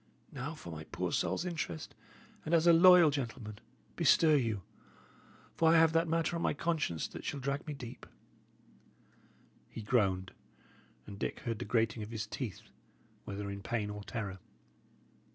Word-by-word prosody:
Now, -, -, -5 dB
for 85 Hz, -, -9 dB
my 80 Hz, -1 st, -7 dB
poor 90 Hz, +2 st, -3 dB
soul's 170 Hz, -, 0 dB
interest, 155 Hz, -, -4 dB, 0.5 s
and 165 Hz, -, +2 dB
as 165 Hz, 0 st, +3 dB
a 170 Hz, -, +8 dB
loyal 175 Hz, -2 st, +8 dB
gentleman, 115 Hz, -6 st, -5 dB, 0.4 s
bestir 160 Hz, -1 st, +5 dB
you; 115 Hz, -8 st, 0 dB, 0.9 s
for 160 Hz, -, +4 dB
I 165 Hz, -, +6 dB
have 160 Hz, 0 st, +5 dB
that 165 Hz, +1 st, +3 dB
matter 165 Hz, +1 st, 0 dB
on 165 Hz, -, -2 dB
my -, -, +1 dB
conscience 150 Hz, -, -1 dB
that -, -, -9 dB
shall 145 Hz, -, -3 dB
drag 140 Hz, +3 st, -3 dB
me 150 Hz, -, -4 dB
deep." 120 Hz, -3 st, -9 dB, 1.6 s
He 110 Hz, -, -8 dB
groaned, 95 Hz, -5 st, +1 dB, 0.7 s
and 100 Hz, -1 st, -9 dB
Dick -, -, -3 dB
heard 115 Hz, -5 st, -3 dB
the -, -, -4 dB
grating 110 Hz, +1 st, +1 dB
of 105 Hz, -, -6 dB
his 110 Hz, -2 st, -4 dB
teeth, 110 Hz, -, -6 dB, 0.6 s
whether 100 Hz, 0 st, -5 dB
in 100 Hz, 0 st, -6 dB
pain 105 Hz, 0 st, -2 dB
or 105 Hz, 0 st, -7 dB
terror. 100 Hz, -4 st, -5 dB
120 Hz, 160 wpm, -33 LUFS, 105-160 Hz, 1.6 s, a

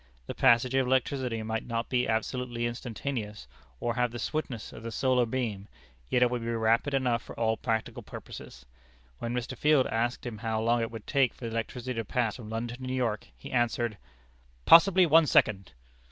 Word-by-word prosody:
The -, -, -5 dB
passage 120 Hz, +2 st, +4 dB
of 135 Hz, -1 st, +2 dB
electricity 130 Hz, -3 st, 0 dB
might 110 Hz, 0 st, -2 dB
not 115 Hz, 0 st, -2 dB
be 125 Hz, -1 st, +1 dB
absolutely 120 Hz, +1 st, -2 dB
instantaneous, 120 Hz, -2 st, -4 dB, 0.3 s
or 120 Hz, -, -1 dB
have 125 Hz, +1 st, +1 dB
the 120 Hz, -, -7 dB
swiftness 125 Hz, -2 st, -4 dB
of -, -, -10 dB
the 115 Hz, -, -5 dB
solar 125 Hz, 0 st, +2 dB
beam, 110 Hz, -5 st, -3 dB, 0.4 s
yet 125 Hz, -, +3 dB
it 125 Hz, -, +2 dB
would 125 Hz, -1 st, -2 dB
be 115 Hz, -, -5 dB
rapid 115 Hz, +4 st, +1 dB
enough 125 Hz, -3 st, +1 dB
for -, -, -11 dB
all 110 Hz, -1 st, +2 dB
practical 110 Hz, -1 st, -2 dB
purposes. -, -, -10 dB, 0.5 s
When 115 Hz, -, -3 dB
Mr. 125 Hz, 0 st, -3 dB
Field 150 Hz, -3 st, +3 dB
asked 120 Hz, +3 st, -1 dB
him 115 Hz, -4 st, -5 dB
how 110 Hz, -1 st, -1 dB
long 115 Hz, +1 st, +2 dB
it 115 Hz, -, -1 dB
would 115 Hz, -2 st, -9 dB
take 135 Hz, -4 st, +2 dB
for 120 Hz, -, -8 dB
the 115 Hz, -, -4 dB
electricity 120 Hz, +2 st, -3 dB
to 115 Hz, -, -1 dB
pass 115 Hz, +1 st, -1 dB
from 110 Hz, -4 st, -9 dB
London 115 Hz, +2 st, -4 dB
to 130 Hz, -, -11 dB
New 130 Hz, 0 st, -3 dB
York, 115 Hz, -5 st, -1 dB
he -, -, -10 dB
answered: 120 Hz, -3 st, 0 dB, 0.7 s
"Possibly 185 Hz, +2 st, +7 dB
one 165 Hz, 0 st, +5 dB
second!" 100 Hz, -7 st, +2 dB
120 Hz, 195 wpm, -29 LUFS, 115-130 Hz, 0.7 s, Possibly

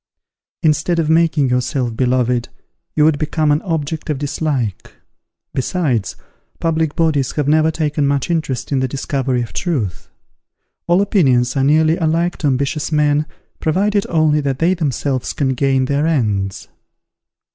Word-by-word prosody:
_ -, -, -73 dB, 0.6 s
Instead 160 Hz, +2 st, +2 dB
of 160 Hz, -2 st, +1 dB
making 160 Hz, -4 st, +3 dB
yourself 125 Hz, -1 st, -1 dB
beloved, 125 Hz, -1 st, +1 dB, 0.5 s
you 150 Hz, -, +3 dB
would 155 Hz, -1 st, +3 dB
become 155 Hz, 0 st, 0 dB
an 145 Hz, +2 st, +2 dB
object 160 Hz, -3 st, -3 dB
of 150 Hz, -, 0 dB
dislike. 140 Hz, -, -3 dB, 0.6 s
Besides, 130 Hz, -, -1 dB, 0.4 s
public 160 Hz, -2 st, 0 dB
bodies 155 Hz, -5 st, +1 dB
have 150 Hz, -2 st, -1 dB
never 155 Hz, +1 st, +4 dB
taken 150 Hz, -2 st, 0 dB
much 140 Hz, -1 st, 0 dB
interest 150 Hz, -7 st, -2 dB
in 135 Hz, -, +2 dB
the 130 Hz, -, 0 dB
discovery 135 Hz, -2 st, -1 dB
of 115 Hz, -, -9 dB
truth. 115 Hz, -, -3 dB, 0.8 s
All 175 Hz, +3 st, +4 dB
opinions 130 Hz, -, +2 dB
are 135 Hz, -, +1 dB
nearly 155 Hz, +3 st, +3 dB
alike 165 Hz, +2 st, 0 dB
to 150 Hz, -, -1 dB
ambitious 140 Hz, +3 st, -1 dB
men, 150 Hz, 0 st, +2 dB, 0.3 s
provided 200 Hz, +5 st, +1 dB
only 155 Hz, -2 st, +2 dB
that 135 Hz, -2 st, -1 dB
they 170 Hz, +5 st, +2 dB
themselves 140 Hz, -5 st, -2 dB
can 140 Hz, -2 st, 0 dB
gain 130 Hz, 0 st, +1 dB
their 140 Hz, +3 st, 0 dB
ends. 105 Hz, -11 st, -1 dB
145 Hz, 145 wpm, -18 LUFS, 130-160 Hz, 0.8 s, never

